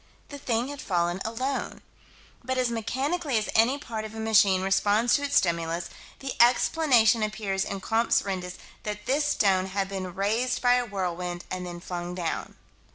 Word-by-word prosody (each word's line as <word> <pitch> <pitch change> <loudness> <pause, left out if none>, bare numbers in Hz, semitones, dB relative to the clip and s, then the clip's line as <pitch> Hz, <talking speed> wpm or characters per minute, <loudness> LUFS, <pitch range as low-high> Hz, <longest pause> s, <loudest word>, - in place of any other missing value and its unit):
The 285 - -8
thing 240 0 -1
had 285 -1 -7
fallen 175 0 -1
alone. 255 +5 -3 0.6
But 260 +1 -2
as 250 -2 +1
mechanically 265 +5 -1
as 215 - -1
any 235 +5 +4
part 230 -7 -5
of 220 0 -8
a - - -6
machine 205 -4 +4
responds 205 +4 +2
to - - +3
its 285 0 -1
stimulus, 170 -1 +1 0.3
the 270 -1 -4
explanation 240 -2 +4
appears 210 -3 -1
in 195 -1 -5
Comptes 225 +3 +2
Rendus 180 -2 -4 0.2
that 210 -1 -5
this 290 +3 +1
stone 195 -9 +2
had 195 0 -2
been 185 -2 -5
raised 220 +6 0
by 245 -1 +4
a 250 0 +2
whirlwind 180 -3 -4
and 180 -1 -4
then 175 0 -7
flung 175 0 -5
down. 175 -3 -4
215 Hz, 170 wpm, -27 LUFS, 185-245 Hz, 0.6 s, any